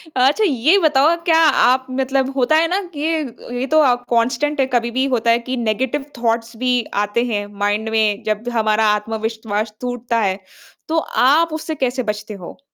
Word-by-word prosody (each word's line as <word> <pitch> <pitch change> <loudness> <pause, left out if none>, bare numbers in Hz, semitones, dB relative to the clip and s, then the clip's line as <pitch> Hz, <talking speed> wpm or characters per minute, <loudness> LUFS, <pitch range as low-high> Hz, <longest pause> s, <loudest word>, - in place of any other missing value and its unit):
अच्छा, 265 +11 +3
ये 310 - +3
बताओ 310 -1 +3
क्या 325 -1 +4 0.2
आप 260 +1 +3
मतलब 265 0 0
होता 270 +3 +2
है 325 +1 +3
ना 370 +3 0
कि 310 +2 -1
अ, 275 -7 -6
ये 245 +1 -2
तो 315 - +5
आप 245 -4 +2
कांस्टेंट 245 +5 0
है, 270 - +3
कभी 235 -1 +1
भी 260 +3 0
होता 230 0 +1
है 230 - +3
कि 260 - -1
नेगेटिव 250 +5 -1
थॉट्स 230 0 -1
भी 250 0 +1 0.2
आते 210 +3 -1
हैं, 205 -1 -1
माइंड 205 +2 0
में 215 -2 0
जब 215 0 -2
द 245 - -4
हमारा 220 -1 +2
आत्मविश्वास 220 0 -3
टूटता 245 -1 -2
है। 195 -2 -1 0.5
तो 320 - -1 0.3
आप 315 +4 +3
उससे 315 0 -4
कैसे 255 -2 -1
बचते 210 0 -5
हो? 185 -4 -10
245 Hz, 190 wpm, -19 LUFS, 220-275 Hz, 0.5 s, तो